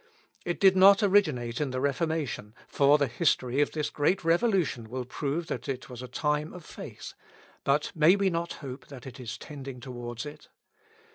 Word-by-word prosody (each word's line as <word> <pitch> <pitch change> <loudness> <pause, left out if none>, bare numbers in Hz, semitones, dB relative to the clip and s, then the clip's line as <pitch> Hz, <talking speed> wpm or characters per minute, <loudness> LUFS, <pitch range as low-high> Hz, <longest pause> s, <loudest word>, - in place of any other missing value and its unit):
It 175 - -2
did 190 -1 +6
not 195 +2 +7
originate 150 - +2
in 145 - 0
the 130 0 -3
Reformation, 140 -6 -2
for 140 +1 +4
the 145 - +2
history 130 0 +1
of 145 - +1
this 150 -2 -2
great 165 +6 +1
revolution 165 - +1
will 125 +1 -4
prove 145 +6 -3
that - - -5
it 135 +1 -5
was 125 -1 -7
a 125 - -7
time 150 +4 -1
of 180 -3 -10
faith; - - -9 0.5
but 140 +2 +1
may 160 +4 +5
we 200 -1 +1
not 170 0 -2
hope 130 0 -8
that 135 -4 -11
it 130 0 -9
is 120 -3 -6
tending 135 -3 -8
towards 120 -1 -6
it? 150 +1 -10
145 Hz, 185 wpm, -28 LUFS, 125-165 Hz, 0.5 s, not